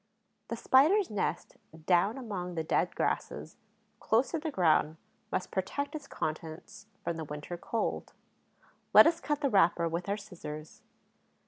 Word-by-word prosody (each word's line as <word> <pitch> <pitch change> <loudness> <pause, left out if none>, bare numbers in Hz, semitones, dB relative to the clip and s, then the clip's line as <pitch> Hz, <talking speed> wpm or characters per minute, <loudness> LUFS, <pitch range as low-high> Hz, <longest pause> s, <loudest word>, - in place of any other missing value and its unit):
The - - -3
Spider's 320 - +4
nest, 190 -5 -2 0.3
down 190 +7 +3
among 190 -8 -5
the 160 - -1
dead - - 0
grasses, - - -2 0.4
close 230 +4 +2
to 330 - -1
the 315 +1 -3
ground, 160 - +2 0.3
must - - -2
protect 240 +10 -2
its 295 -3 -7
contents 160 - -6 0.2
from 170 -1 -2
the 160 - -4
winter 150 +3 -6
cold. 220 +6 -3 0.8
Let - - +11
us 330 +1 +3
cut 295 -1 -1
the 280 - +2
wrapper 170 -3 +4
with 170 +3 -3
our 200 - 0
scissors. 165 -7 -9
190 Hz, 145 wpm, -31 LUFS, 165-265 Hz, 0.8 s, Let